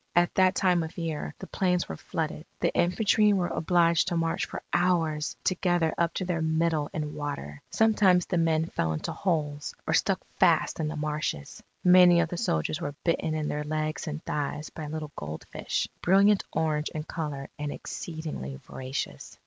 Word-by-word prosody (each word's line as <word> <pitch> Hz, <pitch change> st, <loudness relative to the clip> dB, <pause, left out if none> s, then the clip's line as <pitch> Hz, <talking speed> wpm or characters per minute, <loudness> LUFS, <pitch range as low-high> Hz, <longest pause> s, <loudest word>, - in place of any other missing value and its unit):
At 175 Hz, 0 st, +4 dB
that 185 Hz, 0 st, +4 dB
time 180 Hz, -2 st, +3 dB
of 160 Hz, 0 st, -6 dB
year, 165 Hz, -3 st, -3 dB
the -, -, -8 dB
plains 180 Hz, -2 st, 0 dB
were 80 Hz, -, -5 dB
flooded. -, -, -4 dB
The -, -, +1 dB
infantry 210 Hz, +3 st, +3 dB
were 180 Hz, -3 st, +1 dB
obliged 170 Hz, -1 st, +3 dB
to 175 Hz, -2 st, 0 dB
march 165 Hz, +2 st, 0 dB
for -, -, -7 dB
hours 165 Hz, -4 st, +1 dB
together 175 Hz, -3 st, +1 dB
up 170 Hz, -1 st, +1 dB
to 185 Hz, -, -1 dB
their 175 Hz, -2 st, -1 dB
middle 160 Hz, -1 st, +1 dB
in 150 Hz, -1 st, -3 dB
water. 110 Hz, -, -5 dB
Sometimes 205 Hz, -5 st, +4 dB
the 175 Hz, -, 0 dB
men 160 Hz, -1 st, +2 dB
fell 80 Hz, -, -1 dB
into 75 Hz, -, -3 dB
holes, 150 Hz, -5 st, -2 dB
or -, -, 0 dB
stuck -, -, +2 dB, 0.2 s
fast -, -, +3 dB
in 155 Hz, -, 0 dB
the 155 Hz, -, -4 dB
marshes. 150 Hz, -, -3 dB, 0.2 s
Many 180 Hz, -1 st, +7 dB
of 165 Hz, -1 st, +1 dB
the 175 Hz, -, -4 dB
soldiers 175 Hz, -4 st, -1 dB
were 145 Hz, -2 st, -4 dB
bitten 165 Hz, -2 st, 0 dB
in 155 Hz, -1 st, -1 dB
their 150 Hz, 0 st, -2 dB
legs 155 Hz, +2 st, -2 dB
and 155 Hz, +1 st, -4 dB
thighs 150 Hz, +1 st, -3 dB
by 155 Hz, -2 st, -6 dB
little 155 Hz, -1 st, -5 dB
goldfish, 75 Hz, +1 st, -3 dB
brilliant 195 Hz, +2 st, +4 dB
orange 155 Hz, -1 st, 0 dB
in 155 Hz, -, -2 dB
colour 150 Hz, -4 st, -5 dB
and 145 Hz, -1 st, -2 dB
exceedingly 155 Hz, -, -6 dB
voracious. 130 Hz, -, -6 dB
160 Hz, 175 wpm, -28 LUFS, 150-175 Hz, 0.2 s, Many